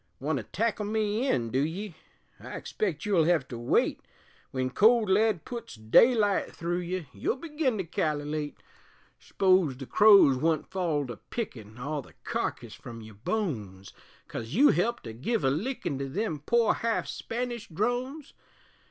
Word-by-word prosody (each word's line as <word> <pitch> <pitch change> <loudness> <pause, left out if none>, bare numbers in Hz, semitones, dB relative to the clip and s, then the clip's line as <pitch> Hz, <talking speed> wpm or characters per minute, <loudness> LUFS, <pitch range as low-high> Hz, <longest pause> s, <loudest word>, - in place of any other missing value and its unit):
Want 145 +2 -1
to 125 - -4
tackle 215 - -1
me 215 +3 0
in, 115 - 0
du 130 - +1
ye? 180 +5 -4 0.5
I - - -8
expect 170 -7 -3
you'll 185 -6 +3
hev 165 -5 +2
to 120 - -6
wait; 120 - +1 0.5
Wen 130 -1 -1
cold 220 - +4
lead 210 -2 +2
puts 235 - -7
daylight 205 - +4
thru 175 +1 -2
ye 180 -1 -3
You'll 100 - -1
begin 295 -4 -1
to 190 - -1
kal'late; 150 -2 -2 0.6
S'pose 185 -8 +2
the 135 - -7
crows 200 -8 +7
wun't 160 +3 0
fall 165 -6 0
to 120 -4 -7
pickin' 115 - -6
All 145 +4 -3
the - - -17
carkiss - - -3
from 115 -1 -10
your 110 0 -11
bones, 105 - -4 0.3
Coz 115 +6 -6
you 285 +6 +7
helped 230 +9 +1
to 115 - -7
give 155 - -1
a 135 - +3
lickin' 165 - -2
To 135 0 -3
them 165 0 -2
poor 235 -2 +4
half 230 0 -1
Spanish 240 -1 -4
drones? 245 - -2
175 Hz, 160 wpm, -28 LUFS, 135-220 Hz, 0.6 s, crows